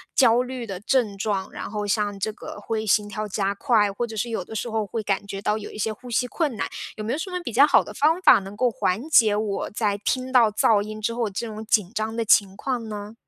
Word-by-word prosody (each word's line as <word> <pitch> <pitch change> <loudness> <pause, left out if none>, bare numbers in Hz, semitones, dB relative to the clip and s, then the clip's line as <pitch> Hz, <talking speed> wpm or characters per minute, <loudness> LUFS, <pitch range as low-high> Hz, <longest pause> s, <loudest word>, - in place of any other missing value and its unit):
焦 245 -2 +5
虑 250 -2 -6
的 195 -3 -5
症 220 -3 +1
状， 195 -2 -2
然 - - -7
后 210 -1 -3
像 205 -1 -1
这 215 +2 -2
个 210 - -9
会 220 +1 -3
心 210 0 +2
跳 210 +1 -4
加 200 -1 -1
快， 215 -2 +2
或 240 +5 -2
者 225 -2 -8
是 235 +3 -1
有 220 -5 -2
的 200 - -11
时 220 +2 -3
候 220 -1 -1
会 220 +3 -4
感 200 -1 -1
觉 200 -1 -6
到 210 +1 0
有 210 - -8
一 - - -10
些 215 +1 -1
呼 245 +4 -12
吸 245 +1 0
困 285 -3 -2
难， - - -1 0.3
有 215 - -5
没 230 - -1
有 - - -1
什 325 - -4
么 360 - -2
比 240 -9 -6
较 270 +5 +7
好 - - +5
的 - - -9
方 315 +5 +2
法， - - +7
能 195 0 -9
够 250 +1 +3
缓 220 +3 -1
解 225 -8 +6
我 210 -1 -2
在 210 -2 -1
听 255 +5 -1
到 235 -4 +5
噪 210 0 +3
音 215 +1 -6
之 230 +2 -1
后 230 -2 -1
这 205 +4 -4
种 220 0 -7
紧 210 -4 +2
张 220 +1 -2
的 230 - -1
情 200 -2 +4
况 245 -4 -3
呢？ 210 0 -7
215 Hz, 290 characters per minute, -24 LUFS, 205-235 Hz, 0.3 s, 较